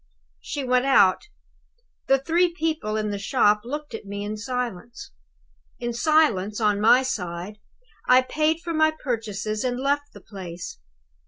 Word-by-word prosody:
"She 285 Hz, -, -5 dB
went 250 Hz, 0 st, +2 dB
out. 200 Hz, -9 st, +5 dB, 0.9 s
The 270 Hz, -, +5 dB
three 335 Hz, +5 st, +1 dB
people 310 Hz, -10 st, -1 dB
in 215 Hz, -1 st, -1 dB
the 200 Hz, -, -3 dB
shop 210 Hz, -1 st, +2 dB
looked 295 Hz, +3 st, -6 dB
at 225 Hz, -, -6 dB
me 200 Hz, 0 st, -6 dB
in 210 Hz, +1 st, -4 dB
silence. 235 Hz, -1 st, -5 dB, 0.7 s
In 240 Hz, 0 st, -3 dB
silence, 235 Hz, -7 st, +2 dB
on 210 Hz, -2 st, +1 dB
my 245 Hz, +4 st, +6 dB
side, 185 Hz, -3 st, -4 dB, 0.5 s
I 255 Hz, +1 st, +6 dB
paid 310 Hz, +4 st, 0 dB
for 340 Hz, -1 st, -4 dB
my 315 Hz, 0 st, +4 dB
purchases, 215 Hz, -4 st, -3 dB
and 250 Hz, -1 st, -1 dB
left 285 Hz, +2 st, -1 dB
the -, -, -12 dB
place. 180 Hz, -, -8 dB
240 Hz, 150 wpm, -24 LUFS, 210-285 Hz, 0.9 s, my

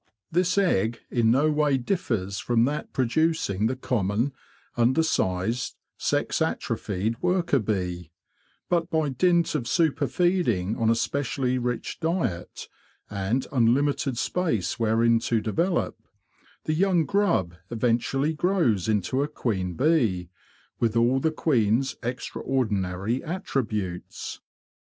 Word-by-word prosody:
This 180 Hz, +3 st, +1 dB
egg 115 Hz, -, +2 dB
in 115 Hz, -2 st, +3 dB
no 140 Hz, +6 st, +3 dB
way 150 Hz, -2 st, +2 dB
differs 115 Hz, -, -2 dB
from 120 Hz, -1 st, +2 dB
that 150 Hz, +3 st, -3 dB
producing 130 Hz, -, +1 dB
the 130 Hz, -, -1 dB
common, 115 Hz, +1 st, -1 dB, 0.4 s
under 130 Hz, +7 st, +3 dB
sized, 110 Hz, -, -1 dB, 0.2 s
sex -, -, -1 dB
atrophied 105 Hz, +4 st, -2 dB
worker 180 Hz, -5 st, +2 dB
bee; 90 Hz, -6 st, -2 dB, 0.6 s
but 170 Hz, -1 st, 0 dB
by 160 Hz, -4 st, +1 dB
dint 170 Hz, +5 st, +2 dB
of 130 Hz, -7 st, -2 dB
super 155 Hz, -2 st, +2 dB
feeding 125 Hz, -, +1 dB
on 115 Hz, -1 st, +1 dB
a 115 Hz, -, +4 dB
specially 130 Hz, 0 st, -1 dB
rich 120 Hz, -1 st, -3 dB
diet, 160 Hz, -, -2 dB, 0.4 s
and 105 Hz, +6 st, -1 dB
unlimited 135 Hz, +1 st, +2 dB
space 140 Hz, -, -1 dB
wherein 115 Hz, +1 st, +3 dB
to 115 Hz, 0 st, 0 dB
develop, 165 Hz, -, -1 dB, 0.6 s
the 155 Hz, -, -1 dB
young 175 Hz, -1 st, +2 dB
grub 175 Hz, -, +1 dB, 0.2 s
eventually 120 Hz, +6 st, 0 dB
grows 150 Hz, -, +1 dB
into 110 Hz, +5 st, +1 dB
a 145 Hz, -, 0 dB
queen 95 Hz, -, -2 dB
bee, 115 Hz, -, +2 dB, 0.5 s
with 115 Hz, -2 st, +1 dB
all 120 Hz, +3 st, +3 dB
the 160 Hz, -, +1 dB
queen's 130 Hz, -5 st, +1 dB
extra 125 Hz, +1 st, -4 dB
ordinary 105 Hz, -3 st, -1 dB
attributes. 110 Hz, -, -3 dB
125 Hz, 120 wpm, -26 LUFS, 110-155 Hz, 0.6 s, a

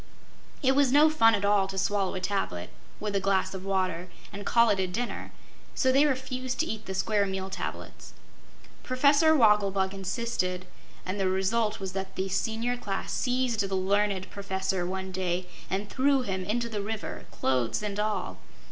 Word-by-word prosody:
It 265 Hz, 0 st, +4 dB
was 280 Hz, -2 st, +4 dB
no 300 Hz, +3 st, +6 dB
fun 225 Hz, -7 st, +5 dB
at 200 Hz, 0 st, -1 dB
all 200 Hz, -1 st, +3 dB
to 195 Hz, 0 st, -6 dB
swallow 195 Hz, -1 st, 0 dB
a -, -, -2 dB
tablet, 185 Hz, -, -2 dB, 0.3 s
with 210 Hz, -1 st, -3 dB
a -, -, +3 dB
glass 190 Hz, -1 st, +1 dB
of 190 Hz, -1 st, -6 dB
water, 185 Hz, -2 st, -1 dB, 0.2 s
and 200 Hz, 0 st, -6 dB
call 235 Hz, -1 st, +5 dB
it 200 Hz, -, +1 dB
a 190 Hz, -, +1 dB
dinner; 230 Hz, +7 st, -4 dB, 0.4 s
so 260 Hz, -, +3 dB
they 280 Hz, +3 st, +5 dB
refused 255 Hz, -2 st, -2 dB
to -, -, 0 dB
eat 220 Hz, -5 st, -5 dB
the 190 Hz, -, -3 dB
Square 200 Hz, +1 st, +1 dB
Meal 190 Hz, 0 st, -4 dB
Tablets. 195 Hz, -, -6 dB, 0.7 s
Professor 285 Hz, +5 st, +4 dB
Wogglebug 200 Hz, -6 st, +3 dB
insisted, 190 Hz, -2 st, -2 dB, 0.4 s
and 185 Hz, +2 st, -3 dB
the 190 Hz, -1 st, +2 dB
result 210 Hz, +4 st, 0 dB
was 190 Hz, -1 st, -4 dB
that 190 Hz, 0 st, -5 dB
the 190 Hz, +1 st, -2 dB
Senior 225 Hz, +5 st, -1 dB
Class 195 Hz, -5 st, -4 dB
seized 250 Hz, -3 st, 0 dB
the 195 Hz, -2 st, 0 dB
learned 195 Hz, 0 st, 0 dB
Professor 190 Hz, -2 st, -2 dB
one 190 Hz, 0 st, -4 dB
day 185 Hz, -1 st, -1 dB, 0.2 s
and 200 Hz, +2 st, -2 dB
threw 270 Hz, +3 st, +2 dB
him 190 Hz, -5 st, -2 dB
into 235 Hz, +4 st, -1 dB
the 215 Hz, -3 st, -3 dB
river 215 Hz, +1 st, -5 dB
clothes 130 Hz, -, 0 dB
and 205 Hz, -1 st, -3 dB
all. 210 Hz, -, -2 dB
200 Hz, 175 wpm, -28 LUFS, 190-235 Hz, 0.7 s, no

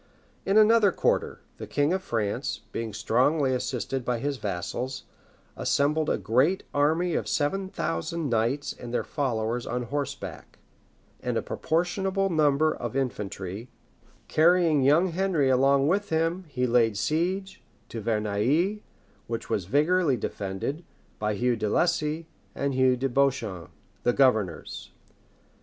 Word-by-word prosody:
In 195 Hz, +2 st, +3 dB
another 215 Hz, -1 st, +6 dB
quarter, -, -, 0 dB, 0.2 s
the -, -, -6 dB
king 145 Hz, +4 st, +1 dB
of 190 Hz, -, -1 dB
France, 115 Hz, -, -2 dB
being 115 Hz, -1 st, -4 dB
strongly 130 Hz, +7 st, +2 dB
assisted 125 Hz, 0 st, -2 dB
by 120 Hz, 0 st, -1 dB
his 140 Hz, +3 st, -2 dB
vassals, 110 Hz, +6 st, -4 dB, 0.5 s
assembled 150 Hz, +2 st, +1 dB
a -, -, +1 dB
great 130 Hz, -, +2 dB
army 160 Hz, +5 st, +2 dB
of -, -, -1 dB
seven 190 Hz, +6 st, 0 dB
thousand 145 Hz, -, -2 dB
knights 120 Hz, +4 st, 0 dB
and 120 Hz, -, -9 dB
their 120 Hz, -, 0 dB
followers 120 Hz, -4 st, -2 dB
on 125 Hz, 0 st, -2 dB
horseback, 140 Hz, +4 st, -5 dB, 0.6 s
and -, -, -1 dB
a -, -, -1 dB
proportionable 190 Hz, +3 st, -1 dB
number 155 Hz, -1 st, +3 dB
of 120 Hz, 0 st, -5 dB
infantry; 105 Hz, -4 st, -4 dB, 0.6 s
carrying 165 Hz, -2 st, +4 dB
young 150 Hz, +8 st, +4 dB
Henry 170 Hz, -5 st, +1 dB
along 135 Hz, +2 st, +4 dB
with 200 Hz, +5 st, +1 dB
him 165 Hz, +3 st, 0 dB
he 125 Hz, -4 st, -1 dB
laid 115 Hz, -3 st, +3 dB
siege 185 Hz, -, -1 dB, 0.3 s
to 115 Hz, -, -5 dB
Verneuil, 115 Hz, -, +1 dB, 0.5 s
which 115 Hz, -1 st, -5 dB
was 95 Hz, -, 0 dB
vigorously 150 Hz, -, +2 dB
defended 100 Hz, -, -4 dB, 0.4 s
by 105 Hz, 0 st, -1 dB
Hugh 120 Hz, +4 st, +1 dB
de 110 Hz, -2 st, -2 dB
Lacy 160 Hz, +2 st, +1 dB, 0.3 s
and 140 Hz, 0 st, -1 dB
Hugh 130 Hz, -1 st, +3 dB
de 135 Hz, +2 st, 0 dB
Beauchamp, 125 Hz, -, 0 dB, 0.3 s
the 120 Hz, -, +2 dB
governors. 110 Hz, -, +1 dB
135 Hz, 135 wpm, -27 LUFS, 115-165 Hz, 0.6 s, another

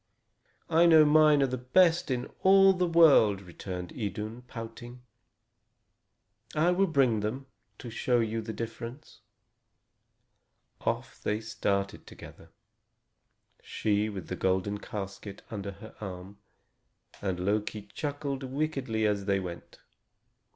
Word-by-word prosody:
"I 170 Hz, +1 st, +4 dB
know 160 Hz, -2 st, +7 dB
mine 150 Hz, -1 st, +5 dB
are -, -, +4 dB
the 130 Hz, -1 st, -3 dB
best 165 Hz, +7 st, +3 dB
in 125 Hz, -2 st, -1 dB, 0.2 s
all 195 Hz, 0 st, +6 dB
the 180 Hz, -1 st, 0 dB
world," 150 Hz, -, +5 dB
returned 90 Hz, 0 st, -7 dB
Idun, 110 Hz, +2 st, -5 dB
pouting. 120 Hz, +1 st, -9 dB, 1.5 s
"I 165 Hz, +4 st, +3 dB
will 195 Hz, +2 st, +2 dB
bring 135 Hz, -9 st, +2 dB
them, 110 Hz, +6 st, -3 dB, 0.3 s
to 120 Hz, -, -9 dB
show 120 Hz, +2 st, +1 dB
you 115 Hz, 0 st, -1 dB
the 110 Hz, 0 st, -6 dB
difference." 115 Hz, +5 st, -8 dB, 1.6 s
Off -, -, -3 dB
they 105 Hz, +1 st, -1 dB
started 105 Hz, -3 st, -2 dB
together, -, -, -13 dB, 1.1 s
she 105 Hz, 0 st, -1 dB
with 95 Hz, -4 st, -7 dB
the 90 Hz, -, -4 dB
golden 95 Hz, +3 st, 0 dB
casket 100 Hz, 0 st, -7 dB
under 100 Hz, -2 st, -5 dB
her 110 Hz, +3 st, -12 dB
arm; 95 Hz, 0 st, -8 dB, 0.8 s
and 95 Hz, -3 st, -2 dB
Loki 105 Hz, +2 st, -1 dB
chuckled 145 Hz, -2 st, -3 dB
wickedly 135 Hz, -5 st, -2 dB
as 100 Hz, -2 st, 0 dB
they 100 Hz, -1 st, +1 dB
went. 85 Hz, -3 st, -8 dB
115 Hz, 120 wpm, -29 LUFS, 100-145 Hz, 1.6 s, know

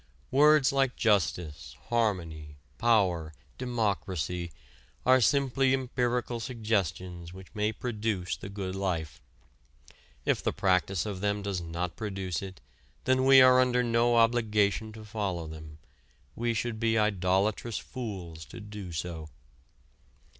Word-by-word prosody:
Words 150 Hz, 0 st, +5 dB
like 135 Hz, -2 st, +1 dB
justice, 90 Hz, -7 st, 0 dB
harmony, 85 Hz, -10 st, -1 dB, 0.2 s
power, 90 Hz, -9 st, +2 dB, 0.2 s
democracy 95 Hz, -, -2 dB, 0.5 s
are 130 Hz, 0 st, +6 dB
simply 135 Hz, +1 st, +3 dB
empirical 125 Hz, -2 st, -1 dB
suggestions 95 Hz, -7 st, -2 dB
which 95 Hz, -1 st, -13 dB
may 105 Hz, 0 st, 0 dB
produce 110 Hz, -5 st, -2 dB
the 100 Hz, -, -9 dB
good 100 Hz, -2 st, -4 dB
life. 90 Hz, -6 st, -3 dB, 1.0 s
If -, -, +1 dB
the -, -, -1 dB
practice 95 Hz, -1 st, +1 dB
of 100 Hz, -3 st, -5 dB
them 100 Hz, 0 st, 0 dB
does 100 Hz, -3 st, -2 dB
not 85 Hz, +1 st, -4 dB
produce 95 Hz, -5 st, -3 dB
it 95 Hz, -1 st, -9 dB, 0.4 s
then 130 Hz, 0 st, +2 dB
we 135 Hz, 0 st, +8 dB
are 130 Hz, 0 st, +7 dB
under 125 Hz, -1 st, +3 dB
no 120 Hz, 0 st, +2 dB
obligation 110 Hz, -2 st, +2 dB
to 110 Hz, 0 st, -10 dB
follow 100 Hz, -6 st, -3 dB
them, 80 Hz, -1 st, -10 dB, 0.6 s
we 120 Hz, 0 st, -1 dB
should 110 Hz, 0 st, -2 dB
be 115 Hz, 0 st, +2 dB
idolatrous 100 Hz, +2 st, +1 dB
fools 95 Hz, -, -6 dB
to -, -, -10 dB
do 105 Hz, -4 st, -8 dB
so. 80 Hz, -1 st, -5 dB
105 Hz, 125 wpm, -29 LUFS, 90-120 Hz, 1.0 s, we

